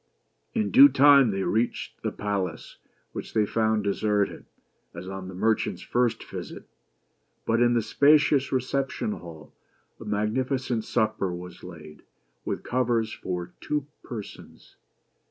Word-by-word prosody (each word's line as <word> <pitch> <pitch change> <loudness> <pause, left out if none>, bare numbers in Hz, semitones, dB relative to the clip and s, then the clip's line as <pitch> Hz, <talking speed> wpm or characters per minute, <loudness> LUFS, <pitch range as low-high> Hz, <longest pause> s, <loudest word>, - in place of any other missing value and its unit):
In 215 -2 0
due 275 +3 +9
time 140 - +6
they 95 -1 -1
reached 115 +5 -2
the - - -2
palace, 100 -5 -4 0.3
which - - -8
they 110 -1 +3
found 110 0 +1
deserted, 100 0 -1 0.5
as 85 +2 -8
on 95 -1 -6
the 95 - -8
merchant's 110 +4 0
first 120 -1 0
visit. - - -8 0.8
But 115 +1 +1
in 120 0 +4
the 115 - +2
spacious 145 +1 +3
reception 135 - -1
hall 80 - -10 0.5
a - - -10
magnificent 115 +3 -1
supper 110 -5 0
was 90 0 -9
laid, 80 -4 -11 0.4
with - - -3
covers 120 -3 0
for 90 -1 -5
two 150 -2 -2 0.2
persons. 110 -5 -10
110 Hz, 130 wpm, -26 LUFS, 95-130 Hz, 0.8 s, due